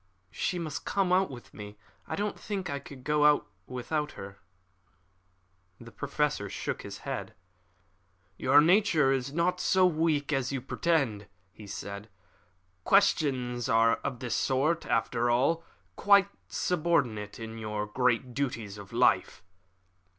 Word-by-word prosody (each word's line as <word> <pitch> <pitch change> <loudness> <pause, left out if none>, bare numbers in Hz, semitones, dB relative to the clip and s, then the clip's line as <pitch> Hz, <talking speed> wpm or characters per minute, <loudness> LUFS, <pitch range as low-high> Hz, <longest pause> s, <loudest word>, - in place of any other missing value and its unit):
She 180 - -2
must 160 -4 -4
come 190 -2 +1
out 190 +1 +3
with 125 -3 -11
me. 105 0 -9 0.3
I - - -3
don't 205 +1 -3
think 195 -7 -4
I 140 - -2
could 135 -2 -12
go 150 +1 +3 0.2
without 150 +4 -3
her." 100 0 -10 1.4
The 115 -1 -12
Professor 140 -4 -2
shook - - -4
his - - -8
head. - - -5 1.0
"Your 140 +8 +5
nature 165 -5 +4
is 135 0 -1
not 170 +4 0
so 185 0 +3
weak 155 -4 +1
as 135 -1 0
you 135 - -2
pretend," 125 -8 0 0.2
he 105 +3 -13
said. 100 +1 -7 0.7
"Questions 130 - +2
of 115 +2 +2
this 125 -2 -3
sort 145 +6 +1
are, - - -4
after 120 0 +1
all, 140 +8 +2 0.3
quite 200 -1 +5 0.2
subordinate 145 - 0
to 115 - -7
the 110 -2 -4
great 125 0 +1
duties 115 -6 -3
of 100 - -11
life." 90 - +2
135 Hz, 135 wpm, -29 LUFS, 115-165 Hz, 1.4 s, Your